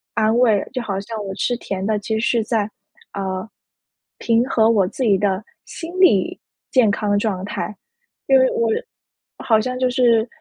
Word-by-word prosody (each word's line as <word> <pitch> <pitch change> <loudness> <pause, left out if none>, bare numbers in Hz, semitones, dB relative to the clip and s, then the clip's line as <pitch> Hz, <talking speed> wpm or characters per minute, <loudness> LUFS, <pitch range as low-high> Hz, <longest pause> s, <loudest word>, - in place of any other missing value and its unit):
安 220 0 +2
慰， 220 -5 +3
就 255 - -2
好 195 -4 -3
像 215 +1 -6
我 195 - -5
吃 245 +4 0
甜 195 -4 -4
的， 215 0 0
其 220 +2 -2
实 - - -2
是 230 -2 +1
在， 215 -2 0 0.5
呃， 190 0 -4 0.7
平 230 0 +2
和 220 -1 +3
我 200 -5 +3
自 260 - -4
己 210 -5 +4
的 195 0 0 0.2
心 330 0 -8
理 360 - +3 0.3
健 250 -5 +4
康 205 0 -1
的 205 - +3
状 195 -3 -2
态， 210 - -4 0.5
因 270 -1 +6
为 260 0 +4
我 230 -1 0 0.7
好 220 -2 +2
像 255 +2 -3
就 255 - +2
是 240 -3 +3
220 Hz, 195 characters per minute, -20 LUFS, 205-240 Hz, 0.7 s, 因